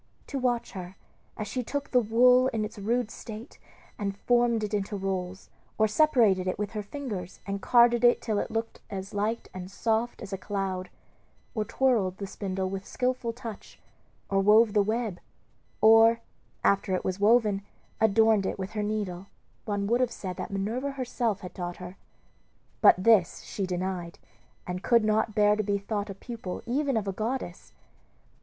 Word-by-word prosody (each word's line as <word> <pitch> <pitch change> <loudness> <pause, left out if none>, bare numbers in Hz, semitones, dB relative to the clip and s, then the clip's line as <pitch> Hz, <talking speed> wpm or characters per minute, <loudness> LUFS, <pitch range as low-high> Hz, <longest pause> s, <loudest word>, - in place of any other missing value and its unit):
To 275 - -4
watch 245 -2 0
her, 185 -3 -8 0.4
as 215 - -4
she 250 +5 -2
took 285 +4 -4
the 250 - +5
wool 250 +3 +5
in 225 -5 -1
its 210 0 -9
rude 230 +2 0
state 225 +3 -9 0.4
and 200 -1 -3
formed 240 -1 +2
it 210 0 -3
into 205 0 -1
rolls, 190 -1 -4 0.3
or 220 - +4
separated 215 -7 +3
it 185 - -1
with 210 -1 -3
her 215 - -3
fingers 205 -6 -6
and 200 0 -4
carded 240 +1 +5
it 240 0 +6
till 215 -3 -1
it - - -3
looked 225 0 -4
as 195 -1 -6
light 210 +3 -1
and 185 0 -7
soft 225 +3 -1
as 195 - -7
a 195 - -3
cloud, 190 -2 -3 0.6
or 215 -2 -1
twirled 215 -8 +1
the 200 - -5
spindle 190 -1 -3
with 190 0 -5
skilful 250 -2 -1
touch, 230 -3 -9 0.5
or 195 - +1
wove 210 +2 +5
the 210 - +4
web, 215 -2 -1 0.6
or, 225 +1 +6 0.4
after 195 -1 +2
it - - -3
was 185 +1 -2
woven, 210 -1 +4 0.4
adorned 220 -2 +4
it - - -3
with 190 +1 -5
her 215 - -2
needle, 205 -3 -3 0.4
one 205 -2 -1
would 235 +4 +2
have 250 - +2
said 185 -5 -5
that - - -5
Minerva 225 +8 -2
herself 240 -5 -2
had 180 -3 -8
taught 175 -2 -5
her. 180 0 -9 0.9
But - - +8
this 210 -6 +4
she 195 -2 -4
denied, 180 -1 -3 0.5
and 180 0 -4
could 235 -1 +3
not 215 0 +1
bear 210 0 +4
to 215 - 0
be 205 -1 0
thought 205 +1 -3
a 195 - -6
pupil 220 -3 -7
even 270 +1 0
of 210 -2 -2
a 195 - -1
goddess. 220 -3 -4
210 Hz, 175 wpm, -28 LUFS, 195-235 Hz, 0.9 s, But